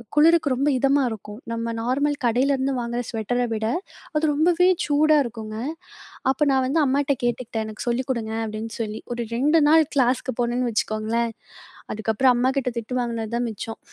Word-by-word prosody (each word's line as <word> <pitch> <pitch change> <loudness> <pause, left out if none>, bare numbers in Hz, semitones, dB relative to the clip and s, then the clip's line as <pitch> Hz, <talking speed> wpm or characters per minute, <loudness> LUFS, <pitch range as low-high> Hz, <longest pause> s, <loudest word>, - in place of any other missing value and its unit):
குளிருக்கு 315 -1 +5
ரொம்ப 275 +3 +1
இதமா 275 +2 +3
இருக்கும். 210 -1 -8
நம்ம 230 0 -2
நார்மல் 280 +5 +1
கடையிலருந்து 265 +3 +2
வாங்குற 240 0 -2
ஸ்வெட்டர 245 +2 -1
விட, 220 0 -1 0.5
அது 305 - +1
ரொம்பவே 345 +4 +3 0.2
சூடா 305 +1 +4
இருக்குங்க. 220 -2 -6 0.7
அப்ப 280 +3 +1
நான் 265 -1 +2
வந்து 295 +5 +1
அம்மாகிட்ட 280 +1 +1
கேட்டுக்கிட்டேன், 230 -2 -2
"எனக்கு 215 +2 -7
சொல்லி 240 +2 0
கொடுங்க" 225 -3 -2
அப்பிடின்னு 220 +1 -5
சொல்லி. 215 0 -5
ஒரு 235 -1 -3
2 300 +6 +3
நாள் 320 +1 +6
கிளாஸ்க்கு 255 -1 +1
போனேன்னு 240 +1 0
வச்சுக்கோங்களேன், 225 +2 -1 0.6
அதுக்கு 220 +1 -1
அப்பறம் 255 +2 +4
அம்மாக்கிட்ட 260 0 +1
திட்டு 250 +3 -3
வாங்கினதான் 235 0 -2
மிச்சம். 225 +1 -7
245 Hz, 155 wpm, -23 LUFS, 225-275 Hz, 0.7 s, நாள்